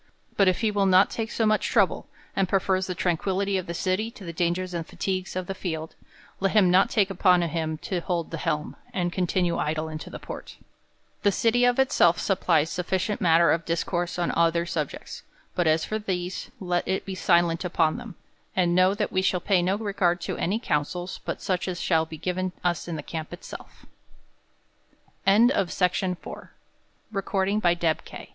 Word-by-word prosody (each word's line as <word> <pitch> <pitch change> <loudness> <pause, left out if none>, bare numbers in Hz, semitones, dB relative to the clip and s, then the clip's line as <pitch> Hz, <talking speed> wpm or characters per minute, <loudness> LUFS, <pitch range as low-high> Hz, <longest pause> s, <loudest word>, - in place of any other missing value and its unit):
But 195 - +4
if 185 - +2
he 220 -2 +2
will 200 -1 +2
not 185 +1 +5
take 225 -1 -3
so 225 - 0
much 215 0 +2
trouble, - - +2 0.3
and 195 -2 +1
prefers 190 -1 +1
the 180 - -3
tranquillity 190 +3 0
of 185 - -7
the 170 - -4
city 185 +6 0
to 215 - -13
the 170 - -6
dangers 175 +2 -1
and 170 -1 -2
fatigues 185 +2 -3
of 185 -1 -2
the 195 - -4
field, 160 -4 -5 0.5
let 195 0 +1
him 195 -5 +5
not 190 +2 +5
take 200 -3 +2
upon 180 -2 +4
him 160 -1 -2
to 185 - -2
hold 170 -1 -2
the 165 - -4
helm, 150 -2 -2 0.2
and 175 -1 -1
continue 180 -1 0
idle 155 +1 -1
in 155 0 -5
the - - -8
port. - - -9 0.6
The 205 - +3
city 235 +4 +3
of 245 0 +3
itself 215 -10 +4
supplies 165 -5 +1
sufficient 190 +3 -1
mat 165 -2 +5
ter 170 - +5
of 165 - +1
discourse 170 +1 -2
on 175 -1 0
other 170 0 +2
subjects; 155 -4 -4 0.3
but 175 -2 +1
as 160 +1 +3
for 215 - -2
these, 180 -3 -4
let 175 -2 -1
it 190 - -1
be 195 - -5
silent 170 -2 +2
upon 165 -3 +1
them; - - -9 0.4
and 175 -2 +2
know, 185 +2 +4
that 210 0 -2
we 185 - +1
shall 185 -1 +1
pay 185 0 +2
no 185 +3 +1
regard 195 -5 0
to - - -3
any 195 +5 0
counsels, 175 -2 -2
bu - - -4
180 Hz, 160 wpm, -26 LUFS, 170-195 Hz, 0.6 s, not